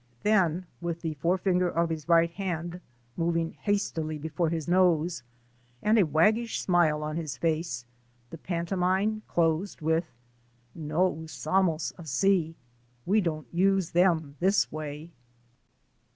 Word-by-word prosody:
" - - -35
Then 185 -5 +2 0.2
with 170 -1 -3
the 160 -2 -2
forefinger 180 +4 +1
of 170 0 0
his 160 +1 -5
right 170 0 +5
hand 175 -1 -4 0.3
moving 165 -1 0
hastily 165 -7 -2
before 160 +2 -1
his 160 -2 -3
nose, 175 -2 +2 0.6
and 215 +1 +4
a 185 - +4
waggish 215 +10 +2
smile 165 -4 +2
on 155 +1 -3
his 155 -5 -4
face, 160 -7 -1 0.5
the - - -8
pantomime 185 +4 0
closed 170 +3 0
with, 160 +2 +1 0.7
No 165 +4 0
iisamos 160 +1 -1
asi'* 165 +2 +1 0.3
( 120 0 -37
We 210 +3 +3
don't 155 -4 -2
use 190 0 +2
them 165 -5 +2
this 195 +3 +2
way 155 +1 -6
170 Hz, 130 wpm, -28 LUFS, 155-185 Hz, 0.7 s, right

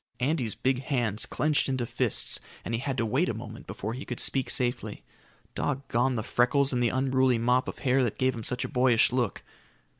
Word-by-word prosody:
Andy's 130 -4 0
big 130 -1 0
hands 120 -6 -1
clenched 150 -2 +1
into 130 -2 -1
fists - - -1 0.3
and 115 - -3
he 115 - 0
had 135 0 -3
to 115 - +1
wait 135 +11 +1
a 115 - -2
moment 110 -1 -9
before 110 +3 -4
he 130 +4 -6
could 120 - -6
speak 135 -2 +1
safely. 125 -1 0 0.5
Doggone 130 -2 0
the 110 - -2
freckles 135 +4 +2
and 125 - +1
the 120 - +3
unruly 130 -1 +2
mop 125 +2 +2
of - - -5
hair 130 0 +2
that 120 - -2
give 130 0 +2
him 115 - -6
such 125 - 0
a - - -2
boyish 125 -4 +3
look. 120 -5 -1
125 Hz, 205 wpm, -28 LUFS, 120-130 Hz, 0.5 s, the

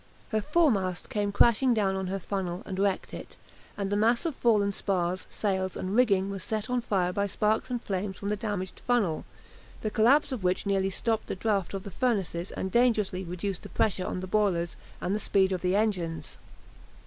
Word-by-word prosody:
Her 215 -1 +1
foremast 200 - +1
came 205 -1 0
crashing 235 +4 +4
down 195 -3 +1
on 190 -1 -2
her 195 +2 -2
funnel, 185 -2 -3
and 190 - -5
wrecked 200 -1 0
it, - - -8 0.4
and 200 -1 -2
the - - +2
mass 230 +7 +2
of 320 -5 -1
fallen 210 -5 +3
spars, 185 -2 -1
sails, 190 -3 -1
and 190 +2 -3
rigging 200 -5 +3
was 195 -1 -5
set 220 +1 -3
on 250 -1 +1
fire 185 -5 0
by 200 0 0
sparks 215 +4 0
and 245 -1 -1
flame 195 -2 -2
from 200 +1 -5
the 210 - +1
damaged 205 -4 -4
funnel, 215 -11 +1 0.6
the 215 - -2
collapse 265 +7 +4
of 245 -7 -4
which 180 +3 +1
nearly 195 -1 +1
stopped 220 +3 -1
the - - -3
draught 195 -2 -1
of 195 - -4
the 200 - -7
furnaces 195 -7 -1
and 190 - -4
dangerously 220 -6 +2
reduced 180 +2 -4
the - - -10
pressure 185 -3 0
on 180 - -3
the - - -4
boilers 185 -4 +1 0.3
and 185 - -1
the 210 - 0
speed 195 -2 +2
of 185 -2 -1
the 180 +1 +1
engines. 175 -7 -1
200 Hz, 200 wpm, -28 LUFS, 185-220 Hz, 0.6 s, crashing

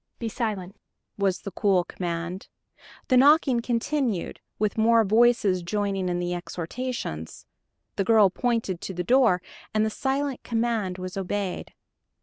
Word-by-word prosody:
"Be 230 - -3
silent," 205 -4 -3 0.4
was 195 -2 +1
the 200 - -6
cool 190 -3 +2
command. 175 0 -5 0.6
The 255 - +5
knocking 275 -2 +5
continued, 235 - -1 0.2
with 210 -1 0
more 225 +1 +4
voices 215 -3 +3
joining 195 0 -1
in 175 - -1
the 175 0 -2
exhortations. 175 - -5 0.5
The 195 - +2
girl 210 -2 +5
pointed 225 -6 -1
to 190 - -6
the 180 - -2
door, 230 -5 +3 0.3
and 215 0 +3
the 220 - -1
silent 270 +1 -2
command 225 -5 -1
was 185 +1 -6
obeyed. 195 0 -3
205 Hz, 135 wpm, -26 LUFS, 185-235 Hz, 0.6 s, The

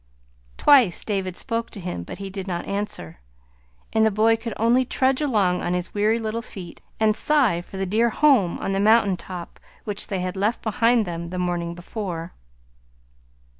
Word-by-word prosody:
Twice 250 - +5
David 190 -4 -2
spoke 230 0 -2
to 205 - -8
him, 180 - -4
but 85 - -8
he 195 -1 -6
did 195 0 -6
not 175 -2 -3
answer; 200 - -4 0.7
and 220 - +3
the 220 - +5
boy 220 +2 +3
could 225 0 -6
only 235 +3 +3
trudge 260 +2 +1
along 200 -11 +1
on 175 +1 -1
his 180 0 -3
weary 215 +2 +2
little 225 0 -3
feet 185 -6 -10 0.2
and 215 -1 +3
sigh 255 - +2
for 190 - -10
the 195 - -1
dear 220 +5 +2
home 240 - +3
on 195 - -3
the 195 - 0
mountain 210 -2 +4
top 180 -1 -9 0.2
which 205 -1 -2
they 195 -4 -2
had 185 +1 -3
left 205 +4 -1
behind 230 +1 +2
them 170 -1 -5
the 185 - -5
morning 175 -1 -2
before. 175 -2 -6
200 Hz, 180 wpm, -23 LUFS, 180-225 Hz, 0.7 s, Twice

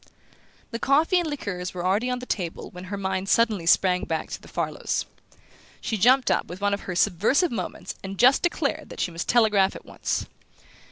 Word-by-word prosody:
The 230 - -4
coffee 310 +8 +3
and 340 -3 -2
liqueurs 185 -11 -4
were 175 0 -4
already 205 +7 +1
on 250 - -1
the 250 - -7
table 175 -8 -4
when 180 +1 -9
her 200 +2 -5
mind 190 0 -2
suddenly 215 -7 +2
sprang 180 +1 +4
back 160 -1 -3
to - - -6
the - - -14
Farlows. - - -2 0.7
She 225 - -2
jumped 250 +6 +4
up - - +1
with 175 +2 -8
one 205 0 +1
of 200 - -4
her 180 - -2
subversive 215 - +2
movements 195 -6 -5
and 195 0 -6
declared 275 - +2
that - - -10
she 180 - -1
must 170 +1 -5
telegraph 215 -5 +4
at - - -10
once. - - -3
200 Hz, 190 wpm, -25 LUFS, 185-250 Hz, 0.7 s, sprang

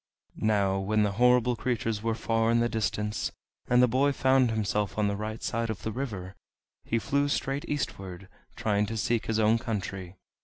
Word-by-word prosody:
Now 100 -3 +2
when 105 +2 +1
the 105 - +1
horrible 125 +2 +4
creatures 115 -3 -1
were 115 0 0
far 115 0 +1
in 115 0 +3
the 120 - +2
distance, 105 -2 -2 0.4
and 125 0 +5
the - - +6
boy 135 +4 +2
found 130 -2 +3
himself 105 -2 -1
on 105 -1 +2
the 100 - 0
right 110 +2 -5
side 115 0 -1
of 110 - -4
the 110 - -2
river, 100 -7 -5 0.5
he 115 - 0
flew 140 +5 +1
straight 140 0 -1
eastward, 95 -10 -4 0.3
trying 105 -1 +1
to 115 - -4
seek 115 +2 0
his 110 - 0
own 110 +1 +4
country. 95 -5 -4
110 Hz, 185 wpm, -28 LUFS, 105-120 Hz, 0.5 s, the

